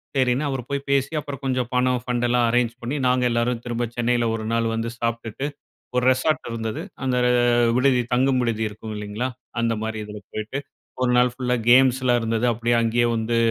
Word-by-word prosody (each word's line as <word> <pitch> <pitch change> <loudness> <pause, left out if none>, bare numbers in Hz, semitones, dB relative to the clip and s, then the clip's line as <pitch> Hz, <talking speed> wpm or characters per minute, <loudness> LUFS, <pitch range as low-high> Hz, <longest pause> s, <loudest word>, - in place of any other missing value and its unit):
சரின்னு 130 +2 +2
அவர் 130 -3 -4
போய் 140 0 -3
பேசி 140 +1 +2
அப்பறம் 145 -2 -7
கொஞ்சம் 130 -2 0
பணம் 125 -1 +2
ஃபண்டுலாம் 120 -1 +1
அரேஞ்ச் 120 -1 +2
பண்ணி, 120 +4 -3
நாங்க 125 0 +2
எல்லாரும் 120 0 0
திரும்ப 120 0 -1
சென்னையில 120 0 +1
1 115 +1 -1
வந்து 115 +1 -2
சாப்ட்டுட்டு, 115 +2 -3 0.5
ஒரு 125 - +2
ரெசார்ட் 130 +2 0
இருந்தது, 115 -1 -3 0.2
அந்த 130 -1 0 0.6
விடுதி 130 -1 +3
தங்கும் 130 +1 +3
விடுதி 115 -2 -1
இருக்கும் 110 +1 -8
இல்லேங்ளா! 105 +4 -3 0.3
அந்தமாரி 110 -1 -1
இதுல 105 0 -8
போயிட்டு, 110 +6 -4 0.4
ஒரு 125 -1 +2
நாள் 125 0 +5
ஃபுல்லா 125 -1 0
கேம்ஸ்லாம் 130 -1 +5
இருந்தது. 115 +1 0
அப்பிடியே 120 +1 0
அங்கேயே 120 +1 +2
வந்து 115 +1 0
120 Hz, 165 wpm, -23 LUFS, 115-130 Hz, 0.6 s, நாள்